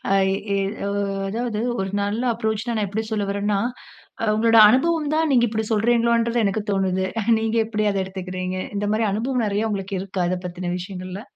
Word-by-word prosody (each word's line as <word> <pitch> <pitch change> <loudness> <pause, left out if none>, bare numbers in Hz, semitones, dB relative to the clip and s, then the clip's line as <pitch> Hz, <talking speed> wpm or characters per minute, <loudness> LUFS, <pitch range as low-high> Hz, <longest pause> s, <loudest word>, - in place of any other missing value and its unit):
அ - - +5 0.4
இ - - +2 0.3
உ - - -2 0.4
அதாவது 225 0 -2 0.2
ஒரு 190 0 -2
நல்ல 205 +4 -1
அப்ரோச்னு 220 +1 -2
நான் 215 -2 0
எப்டி 210 +3 -2
சொல்ல 210 -2 -1
வரறேன்னா, 200 0 0 0.6
அ - - 0
உங்களோட 225 +1 +3
அனுபவம் 305 +4 +1
தான் 315 -1 +2
நீங்க 240 -2 +4
இப்டி 220 0 -2
சொல்கிறீங்களோன்றது 235 +1 +2
எனக்கு 205 +1 0
தோணுது. 190 -1 0 0.3
நீங்க 225 +1 -1
எப்டி 215 -1 -1
அத 195 - 0
எடுத்துக்குறீங்க? 185 -1 -5 0.2
இந்த 205 0 -1
மாரி 220 0 +1
அனுபவம் 245 +3 0
நிறைய 210 +2 0 0.3
இருக்கா, 190 -1 -2
இத 185 - -1
பத்தின 175 0 -4
விஷயங்கள்ல? 185 +1 -7
215 Hz, 170 wpm, -22 LUFS, 195-230 Hz, 0.6 s, அ